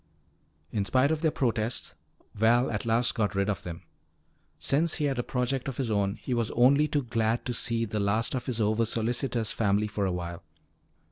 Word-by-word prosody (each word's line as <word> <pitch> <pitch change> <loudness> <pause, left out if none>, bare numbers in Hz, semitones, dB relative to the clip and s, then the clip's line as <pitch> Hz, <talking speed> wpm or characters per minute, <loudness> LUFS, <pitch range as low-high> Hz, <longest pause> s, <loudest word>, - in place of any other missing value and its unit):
In 105 - 0
spite 130 +8 +2
of 155 -1 -1
their 160 - +3
protests, 120 -4 -1 0.4
Val 115 +4 +3
at 105 +1 -3
last 115 +2 +3
got 105 -3 -1
rid 100 +1 +1
of 100 - -4
them. 85 0 -8 0.7
Since 160 +4 +1
he 150 - -1
had 135 -3 -1
a - - +3
project 125 +1 -2
of 135 - -4
his 125 -5 -1
own, 100 -1 +1
he 120 +3 -4
was 115 -2 0
only 140 +5 +5
too 145 -2 0
glad 115 -1 0
to 125 - -2
see 115 0 0
the 105 0 -3
last 105 +3 +1
of 125 -2 -3
his 120 -3 0
oversolicitous 115 +2 0
family 105 -1 +1
for 105 -1 -2
awhile. 85 -2 -4
115 Hz, 190 wpm, -28 LUFS, 105-125 Hz, 0.7 s, only